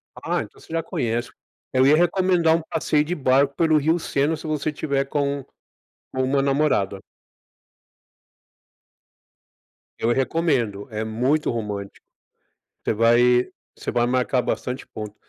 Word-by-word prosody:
Ah, - - -2
então - - -15
você 160 - -12
já 165 - +1
conhece. 120 0 -2 0.4
Eu 130 +1 +3
ia 150 +2 +6
recomendar 175 -1 +3
um 165 - -1
passeio 150 -2 +1
de 160 +4 -3
barco 140 0 +2
pelo 160 0 +3
Rio 160 +4 +2
Sena, 145 +1 0
se 155 - -8
você 155 0 -1
tiver 140 -2 -1
com 140 -1 -2 0.7
com 130 - -1
uma 135 +2 +1
namorada. 135 -9 +1 3.0
Eu 115 - +1
recomendo, 130 - 0
é 110 0 -3
muito 125 +8 0
romântico, 105 -3 -5 0.8
você - - 0
vai 120 +2 +4 0.3
você - - -6
vai 120 -1 +2
marcar 125 +1 +1
bastante 125 +2 -3
ponto. 105 -1 -8
135 Hz, 135 wpm, -23 LUFS, 120-155 Hz, 3.0 s, ia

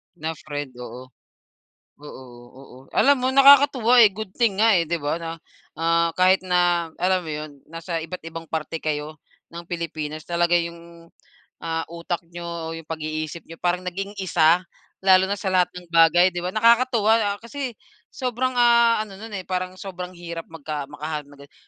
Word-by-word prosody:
Na 160 -1 -4
friend, 145 -3 -6
oo. 125 +1 -9 0.9
Oo, 145 -3 -11 0.4
oo. 130 -1 -14 0.2
Alam 285 +1 +5
mo 255 - +1
nakakatuwa 270 -3 +6
eh, 215 - +8
good 195 -1 -8
thing 225 -5 +1
nga 225 0 +5
eh, 165 - -1
di 170 - 0
ba, 150 +2 -2
na 165 - -5 0.5
ah, 165 0 +2
kahit 185 +1 +4
na 175 -2 +1
alam 185 +1 +1
mo 160 - -8
yun, 150 0 -5 0.2
nasa 165 +1 -4
iba't 165 +1 -7
ibang 165 0 -8
parte 160 0 -3
kayo 155 0 -4 0.3
ng 170 - -6
Pilipinas 155 -3 -5
talaga 175 0 +2
yung, 170 0 -7 0.5
ah, 165 0 -2
utak 170 +1 -4
niyo 170 0 -8
o 165 -1 -5
yung 165 -1 -10
pag-iisip 155 0 -4
niyo 165 0 -12
parang 180 +1 0
naging 195 +3 -5
isa 175 -1 +3 0.4
lalo 190 0 +6
na 200 - 0
sa 190 0 -3
lahat 180 -1 +3
ng 175 -1 -11
bagay, 170 +2 +5
di 175 - -3
ba? 180 - -2
Nakakatuwa 225 -2 +3
kasi 255 0 -5 0.3
sobrang 255 0 -2
ah, 235 -1 +5
ano 200 - -13
nun 225 +1 -9
eh, 185 - -5
parang 185 0 -3
sobrang 180 -2 -7
hirap 170 -1 -7
magka 150 -3 -6
makahanap 150 0 -5
ng 145 - -16
ganon. - - -30
175 Hz, 175 wpm, -23 LUFS, 160-195 Hz, 0.9 s, eh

